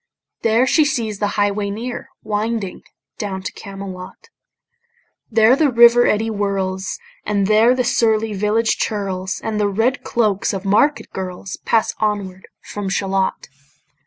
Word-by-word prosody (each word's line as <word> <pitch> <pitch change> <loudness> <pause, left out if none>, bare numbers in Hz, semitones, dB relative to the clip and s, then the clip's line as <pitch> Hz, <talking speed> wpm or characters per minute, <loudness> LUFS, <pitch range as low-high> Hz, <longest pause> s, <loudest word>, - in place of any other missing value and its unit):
There 230 +3 +3
she 310 +4 +4
sees 230 -8 -2
the 205 - +1
highway 205 0 +1
near 235 +5 -5
Winding 210 -2 -2 0.4
down 190 -2 -4
to 185 - -4
Camelot: 195 -2 -9 1.0
There 225 +2 +5
the 295 0 +3
river 235 0 +6
eddy 220 +2 +1
whirls, 195 -2 -2 0.3
And 200 -2 0
there 220 +4 +4
the 255 - +1
surly 220 -2 +1
village 210 +3 +1
churls, 190 -3 -2
And 220 -1 -2
the 205 - +2
red 225 +7 0
cloaks 210 -5 0
of 195 0 -5
market 280 +10 +2
girls, 185 0 -6
Pass 225 -1 +2
onward 200 -3 -2 0.2
from 205 -2 -5
Shalott. 195 -1 -1
210 Hz, 135 wpm, -19 LUFS, 195-225 Hz, 1.0 s, river